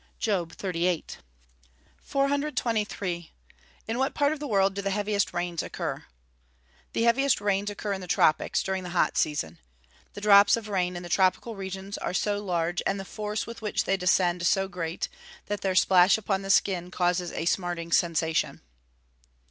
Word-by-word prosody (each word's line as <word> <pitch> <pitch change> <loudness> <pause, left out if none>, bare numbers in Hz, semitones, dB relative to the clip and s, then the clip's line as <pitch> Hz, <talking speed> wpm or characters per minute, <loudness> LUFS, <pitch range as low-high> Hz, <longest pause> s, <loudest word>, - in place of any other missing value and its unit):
JOB 180 -7 -1
XXXVIII.] 180 -3 -2 0.8
423. 230 - -1 0.6
In 230 +3 -2
what 270 +1 0
part 290 0 +2
of 310 - -7
the 295 - -4
world 195 -4 +2
do 200 - -3
the 195 - -2
heaviest 205 0 0
rains 175 -1 -2
occur? - - -5 0.9
The 230 - 0
heaviest 250 +3 +3
rains 205 0 0
occur 205 0 -3
in 190 - -5
the 180 - -8
tropics, 155 -3 +2
during 190 -1 -2
the 180 - -7
hot - - +2
season. 85 - -1 0.6
The 205 - -7
drops 205 0 +7
of 215 -2 -7
rain 180 -3 0
in 175 - -6
the - - -7
tropical 190 +5 +1
regions 195 0 -6
are - - -3
so 205 0 0
large, 175 -2 -1
and 195 0 -1
the 195 - -6
force 210 +1 -4
with 230 0 -9
which 210 -1 -1
they 195 - +1
descend 180 -2 +2
so 195 +2 +2
great, 170 -2 -4 0.4
that 205 0 -3
their 190 -1 0
splash 185 +1 +5
upon 195 -2 -1
the 195 - -7
skin 185 -3 +2
causes 180 -1 0
a - - -4
_smarting 175 -2 -1
sensation. 160 -1 +1
195 Hz, 170 wpm, -27 LUFS, 175-210 Hz, 0.9 s, drops